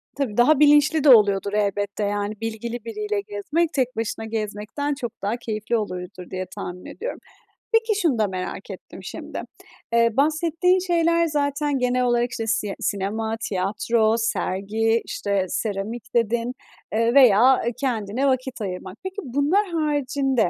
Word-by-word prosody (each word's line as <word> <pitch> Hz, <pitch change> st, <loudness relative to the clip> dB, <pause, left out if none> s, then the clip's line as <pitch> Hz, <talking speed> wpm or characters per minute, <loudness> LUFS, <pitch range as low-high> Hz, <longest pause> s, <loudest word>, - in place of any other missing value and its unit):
Tabii, 260 Hz, -7 st, -2 dB
daha 270 Hz, +4 st, +5 dB
bilinçli 295 Hz, +1 st, +5 dB
de 295 Hz, -, +6 dB
oluyordur 200 Hz, -4 st, +5 dB
elbette, 205 Hz, 0 st, -1 dB
yani, 205 Hz, +1 st, -1 dB
bilgili 225 Hz, +1 st, -4 dB
biriyle 210 Hz, -2 st, -2 dB
gezmek, 250 Hz, +12 st, -1 dB
tek 255 Hz, -2 st, 0 dB
başına 225 Hz, 0 st, -3 dB
gezmekten 220 Hz, +6 st, -3 dB
çok 250 Hz, -4 st, -4 dB
daha 210 Hz, +4 st, -1 dB
keyifli 225 Hz, 0 st, -2 dB
oluyordur 180 Hz, -3 st, -6 dB
diye 185 Hz, 0 st, -4 dB
tahmin 180 Hz, 0 st, -7 dB
ediyorum. 475 Hz, +4 st, -6 dB, 0.5 s
Peki, 450 Hz, -2 st, +2 dB
şunu 285 Hz, -10 st, +2 dB
da 215 Hz, -, +3 dB
merak 185 Hz, -1 st, -5 dB
ettim -, -, -10 dB
şimdi. -, -, -6 dB, 0.5 s
Eee, 230 Hz, 0 st, +5 dB
bahsettiğin 330 Hz, +5 st, +2 dB
şeyler 335 Hz, -2 st, +2 dB
zaten 290 Hz, -2 st, 0 dB
genel 250 Hz, 0 st, +1 dB
olarak 240 Hz, 0 st, +1 dB
işte 225 Hz, -1 st, -4 dB
sie 210 Hz, -2 st, 0 dB
sinema, 220 Hz, +3 st, -2 dB
tiyatro, 215 Hz, +3 st, +1 dB
sergi, 225 Hz, +1 st, 0 dB
işte, 200 Hz, -2 st, -1 dB
seramik 220 Hz, +3 st, -4 dB
dedin, 235 Hz, +1 st, +1 dB, 0.4 s
eee, 230 Hz, +2 st, +2 dB
veya, 255 Hz, -1 st, +6 dB
eee, 235 Hz, -, +1 dB
kendine 240 Hz, -1 st, -1 dB
vakit 260 Hz, -2 st, -1 dB
ayırmak. 185 Hz, +1 st, -5 dB
Peki, 380 Hz, 0 st, -5 dB
bunlar 285 Hz, -, +1 dB
haricinde, 275 Hz, -, +1 dB
230 Hz, 145 wpm, -23 LUFS, 205-280 Hz, 0.5 s, de